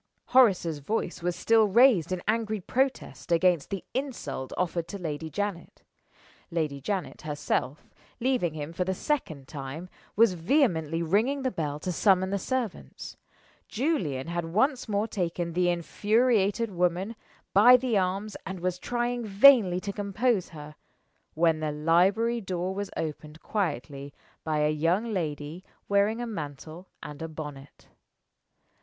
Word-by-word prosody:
Horace's 190 Hz, -, +4 dB
voice 175 Hz, +4 st, -3 dB
was 175 Hz, 0 st, -1 dB
still 225 Hz, -1 st, +4 dB
raised 210 Hz, -, +5 dB
in 185 Hz, -1 st, -3 dB
angry 215 Hz, -1 st, 0 dB
protest 260 Hz, -1 st, -2 dB
against 170 Hz, -3 st, +3 dB
the 195 Hz, -2 st, -5 dB
insult 240 Hz, -, -4 dB
offered 170 Hz, -2 st, -1 dB
to 200 Hz, -, -6 dB
Lady 160 Hz, -3 st, -4 dB
Janet; 205 Hz, 0 st, -4 dB, 0.7 s
Lady 155 Hz, -5 st, -2 dB
Janet 190 Hz, +5 st, -3 dB
herself 145 Hz, -2 st, -2 dB, 0.3 s
(leaving 240 Hz, -, 0 dB
him 150 Hz, +1 st, -6 dB
for 180 Hz, -, -1 dB
the 190 Hz, +1 st, -2 dB
second 160 Hz, -, -3 dB
time) 145 Hz, +5 st, -7 dB, 0.3 s
was 225 Hz, -2 st, +5 dB
vehemently 170 Hz, -, +1 dB
ringing 225 Hz, -, +1 dB
the 260 Hz, -, 0 dB
bell 150 Hz, -6 st, -3 dB
to 180 Hz, -, -2 dB
summon 190 Hz, +1 st, +3 dB
the 200 Hz, -, 0 dB
servants; 245 Hz, -2 st, -4 dB, 0.5 s
Julian 215 Hz, -, -1 dB
had 170 Hz, 0 st, -3 dB
once 240 Hz, -, 0 dB
more 205 Hz, +1 st, 0 dB
taken 175 Hz, -4 st, -3 dB
the 180 Hz, +1 st, +2 dB
infuriated 210 Hz, +4 st, +1 dB
woman 180 Hz, +4 st, 0 dB, 0.4 s
by 240 Hz, +6 st, +8 dB
the 250 Hz, -2 st, -1 dB
arms 195 Hz, +2 st, -1 dB
and 190 Hz, -1 st, -6 dB
was 180 Hz, 0 st, -2 dB
trying 240 Hz, +1 st, -2 dB
vainly 205 Hz, -3 st, +6 dB
to 200 Hz, 0 st, -4 dB
compose 205 Hz, +1 st, 0 dB
her 150 Hz, -1 st, -10 dB, 0.6 s
when 165 Hz, -1 st, +2 dB
the 155 Hz, -1 st, -2 dB
library 185 Hz, +10 st, +2 dB
door 185 Hz, -1 st, -3 dB
was 200 Hz, +1 st, -4 dB
opened 155 Hz, 0 st, -5 dB
quietly 145 Hz, -, -3 dB, 0.3 s
by 155 Hz, -1 st, 0 dB
a 150 Hz, 0 st, +2 dB
young 175 Hz, +9 st, 0 dB
lady 155 Hz, -1 st, -4 dB, 0.2 s
wearing 200 Hz, +3 st, +2 dB
a 240 Hz, -, -3 dB
mantle 160 Hz, -, -7 dB, 0.2 s
and 150 Hz, 0 st, -8 dB
a 165 Hz, -, -3 dB
bonnet. 150 Hz, -3 st, -10 dB
180 Hz, 140 wpm, -27 LUFS, 160-220 Hz, 0.7 s, by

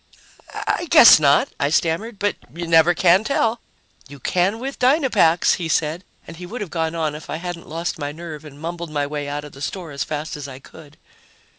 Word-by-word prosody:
"I 350 Hz, -, -1 dB
guess 305 Hz, -, +9 dB
not," 145 Hz, -1 st, +3 dB
I 140 Hz, -, +1 dB
stammered. 170 Hz, +8 st, 0 dB
"But 205 Hz, +1 st, 0 dB, 0.2 s
you 170 Hz, 0 st, -4 dB
never 165 Hz, +1 st, +4 dB
can 180 Hz, +3 st, +4 dB
tell." 225 Hz, -2 st, 0 dB, 0.5 s
"You 140 Hz, +1 st, -12 dB
can 185 Hz, -, 0 dB
with 270 Hz, +4 st, -6 dB
Dynapacks," 255 Hz, -, +3 dB
he 170 Hz, -3 st, -4 dB
said, 160 Hz, +3 st, 0 dB, 0.2 s
and 165 Hz, -, -11 dB
he 180 Hz, 0 st, -8 dB
would 235 Hz, +6 st, -7 dB
have 195 Hz, -6 st, -6 dB
gone 160 Hz, -1 st, -2 dB
on 155 Hz, -2 st, -1 dB
if 150 Hz, +1 st, -10 dB
I -, -, -3 dB
hadn't 170 Hz, +1 st, -7 dB
lost 165 Hz, +2 st, -4 dB
my 145 Hz, -1 st, -3 dB
nerve 160 Hz, -1 st, -9 dB
and 145 Hz, -2 st, -13 dB
mumbled 170 Hz, +1 st, -5 dB
my 145 Hz, -1 st, -1 dB
way 145 Hz, 0 st, -5 dB
out 145 Hz, +1 st, -4 dB
of 150 Hz, -, -11 dB
the 135 Hz, -, -14 dB
store 170 Hz, +2 st, -5 dB
as 140 Hz, -1 st, -3 dB
fast 155 Hz, +2 st, -5 dB
as 145 Hz, -1 st, -7 dB
I 130 Hz, -2 st, -9 dB
could. 150 Hz, +2 st, -16 dB
165 Hz, 210 wpm, -21 LUFS, 150-180 Hz, 0.5 s, guess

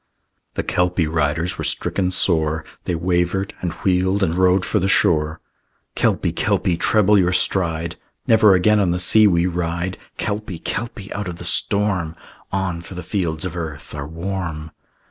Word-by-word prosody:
The -, -, -1 dB
Kelpie 90 Hz, -1 st, +1 dB
riders 80 Hz, +2 st, -1 dB
were -, -, -2 dB
stricken 95 Hz, -2 st, -1 dB
sore; 80 Hz, -4 st, +1 dB, 0.2 s
They 90 Hz, -, -1 dB
wavered, 90 Hz, +3 st, 0 dB
and 90 Hz, -, -2 dB
wheeled, 95 Hz, +1 st, +2 dB
and 85 Hz, -4 st, +1 dB
rode 90 Hz, +1 st, +3 dB
for -, -, +1 dB
the 95 Hz, -, 0 dB
shore. 80 Hz, -2 st, +2 dB, 0.5 s
"Kelpie, -, -, +1 dB
Kelpie, 90 Hz, -, 0 dB
treble 105 Hz, +3 st, +3 dB
your 90 Hz, -1 st, +2 dB
stride! 85 Hz, -3 st, 0 dB, 0.3 s
Never 110 Hz, -3 st, +6 dB
again 105 Hz, +4 st, +3 dB
on 95 Hz, -3 st, +2 dB
the 85 Hz, -, 0 dB
sea 105 Hz, +4 st, +6 dB
we 85 Hz, -3 st, +2 dB
ride. 90 Hz, +1 st, -2 dB, 0.2 s
"Kelpie, 105 Hz, -3 st, -3 dB
Kelpie, 105 Hz, +1 st, -5 dB
out 100 Hz, 0 st, -4 dB
of 90 Hz, -, -5 dB
the -, -, -10 dB
storm; 95 Hz, -6 st, 0 dB, 0.4 s
On, 90 Hz, -3 st, -2 dB
for 85 Hz, +2 st, -10 dB
the 90 Hz, -, -6 dB
fields 85 Hz, -5 st, -2 dB
of 90 Hz, -2 st, -4 dB
earth 80 Hz, -4 st, -6 dB
are 70 Hz, -1 st, -5 dB
warm!" 80 Hz, -2 st, -5 dB
90 Hz, 165 wpm, -21 LUFS, 85-95 Hz, 0.5 s, Never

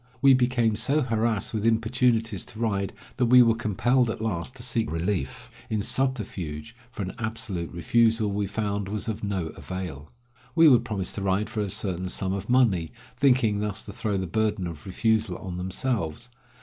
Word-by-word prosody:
We 135 Hz, 0 st, +7 dB
became 125 Hz, -3 st, +2 dB
so 135 Hz, +8 st, +2 dB
harassed 115 Hz, -4 st, 0 dB
with 110 Hz, -2 st, -2 dB
importunities 115 Hz, -1 st, +1 dB
to 110 Hz, -, -11 dB
ride 100 Hz, -4 st, 0 dB, 0.3 s
that 125 Hz, -2 st, +2 dB
we 125 Hz, +1 st, +8 dB
were 115 Hz, -1 st, +4 dB
compelled 120 Hz, +3 st, +1 dB
at 110 Hz, -, -3 dB
last 110 Hz, +1 st, -3 dB
to 120 Hz, -, -5 dB
seek 115 Hz, -2 st, 0 dB
relief 105 Hz, +8 st, -3 dB, 0.2 s
in 110 Hz, -2 st, 0 dB
subterfuge, 100 Hz, -, -2 dB
for 115 Hz, -4 st, -5 dB
an 95 Hz, -, -5 dB
absolute 110 Hz, -6 st, -3 dB
refusal, 110 Hz, +4 st, +2 dB
we 100 Hz, 0 st, -1 dB
found, 100 Hz, -1 st, -2 dB
was 105 Hz, +1 st, -2 dB
of 110 Hz, -2 st, -4 dB
no 95 Hz, -5 st, -2 dB
avail. 90 Hz, -6 st, -6 dB, 0.5 s
We 165 Hz, 0 st, +7 dB
would 125 Hz, -5 st, +6 dB
promise 100 Hz, -5 st, -2 dB
to 100 Hz, -, -5 dB
ride 100 Hz, +2 st, 0 dB
for 110 Hz, -, -2 dB
a 100 Hz, -, -2 dB
certain 95 Hz, -1 st, -1 dB
sum 95 Hz, 0 st, -1 dB
of 100 Hz, +3 st, -5 dB
money, 110 Hz, -10 st, +3 dB, 0.2 s
thinking 125 Hz, -6 st, +3 dB
thus 105 Hz, 0 st, -3 dB
to 100 Hz, -, -8 dB
throw 105 Hz, 0 st, -1 dB
the 95 Hz, -, -2 dB
burden 105 Hz, +1 st, 0 dB
of 85 Hz, 0 st, -7 dB
refusal 110 Hz, -1 st, +1 dB
on 90 Hz, -2 st, -6 dB
themselves. 95 Hz, -, -2 dB
110 Hz, 180 wpm, -26 LUFS, 95-120 Hz, 0.5 s, we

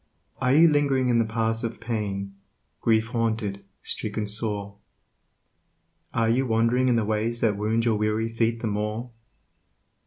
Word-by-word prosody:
Are 125 Hz, -, +2 dB
you 160 Hz, +5 st, +7 dB
ling'ring 140 Hz, -4 st, +2 dB
in 120 Hz, -1 st, +3 dB
the 115 Hz, -, +3 dB
paths 115 Hz, 0 st, 0 dB
of 115 Hz, 0 st, -4 dB
pain, 100 Hz, -4 st, -3 dB, 0.5 s
grief 110 Hz, 0 st, +2 dB
haunted, 110 Hz, -4 st, -1 dB, 0.2 s
stricken 105 Hz, -, -3 dB
sore? 105 Hz, -1 st, -3 dB, 1.3 s
Are 115 Hz, -1 st, +1 dB
you 125 Hz, +4 st, +2 dB
wand'ring 115 Hz, +3 st, +2 dB
in 125 Hz, -, +3 dB
the 115 Hz, -2 st, +1 dB
ways 110 Hz, +2 st, -1 dB
that 110 Hz, -3 st, +2 dB
wound 110 Hz, +3 st, 0 dB
your 115 Hz, -3 st, +2 dB
weary 105 Hz, +1 st, 0 dB
feet 115 Hz, 0 st, -1 dB
the 115 Hz, -, -1 dB
more? 105 Hz, +3 st, -3 dB
115 Hz, 150 wpm, -25 LUFS, 105-120 Hz, 1.3 s, you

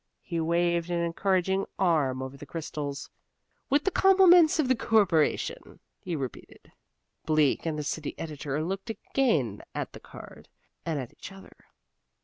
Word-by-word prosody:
He 170 Hz, -2 st, -3 dB
waved 170 Hz, +1 st, +1 dB
an 175 Hz, -, 0 dB
encouraging 190 Hz, +2 st, 0 dB
arm 145 Hz, -8 st, +1 dB
over 130 Hz, +1 st, -7 dB
the 140 Hz, +1 st, -11 dB
crystals. 145 Hz, -2 st, -5 dB, 0.6 s
"With 285 Hz, +1 st, +3 dB
the 390 Hz, -, +1 dB
compliments 365 Hz, -5 st, +6 dB
of 305 Hz, -5 st, +1 dB
the 260 Hz, -, +3 dB
Corporation," 215 Hz, -, +1 dB, 0.2 s
he 180 Hz, -4 st, -4 dB
repeated. 135 Hz, -5 st, -8 dB, 0.6 s
Bleak 155 Hz, 0 st, +2 dB
and 155 Hz, -1 st, -2 dB
the 150 Hz, -, -3 dB
city 145 Hz, +1 st, -4 dB
editor 150 Hz, -1 st, -4 dB
looked 195 Hz, +6 st, -4 dB
again 195 Hz, -, 0 dB
at -, -, -4 dB
the -, -, -10 dB
card, -, -, -13 dB, 0.4 s
and 160 Hz, -2 st, -1 dB
at 130 Hz, -4 st, -5 dB
each -, -, -10 dB
other. 195 Hz, 0 st, -14 dB
170 Hz, 145 wpm, -28 LUFS, 150-200 Hz, 0.6 s, compliments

